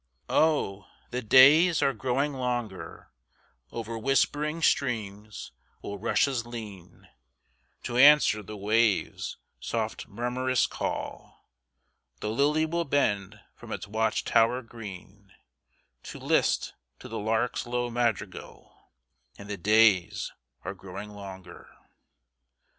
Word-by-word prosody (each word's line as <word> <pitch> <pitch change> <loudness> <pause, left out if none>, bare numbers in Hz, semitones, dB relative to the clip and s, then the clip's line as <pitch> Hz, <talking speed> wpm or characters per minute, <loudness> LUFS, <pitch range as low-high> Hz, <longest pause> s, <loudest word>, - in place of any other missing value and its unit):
Oh, 125 -11 +1 0.2
the 125 +1 -2
days 145 +8 +6
are 135 - +2
growing 130 +5 -1
longer; 120 -6 -4 0.6
Over 115 0 -5
whispering 150 +5 0
streams 105 -7 -1 0.3
will 100 0 -6
rushes 125 +3 +1
lean, 105 -7 -10 0.8
To 120 - -3
answer 140 -5 +6
the 105 +1 -9
waves' 105 +1 0 0.2
soft 110 - -3
murmurous 125 +3 0
call; - - -6 0.7
The 105 - -3
lily 150 +6 +2
will 170 +2 -1
bend 105 -8 0
from - - -12
its - - -4
watch 110 +2 0
tower 120 +3 +3
green, 100 -3 -11 0.7
To - - -8
list - - +1 0.2
to - - -11
the - - -5
lark's 110 +3 -1
low 120 0 -2
madrigal, 115 -5 -3 0.6
And 100 - -11
the - - -2
days 105 -1 +3 0.3
are 95 - -3
growing 95 +2 -9
longer. 95 -3 -11
115 Hz, 110 wpm, -27 LUFS, 100-130 Hz, 0.8 s, days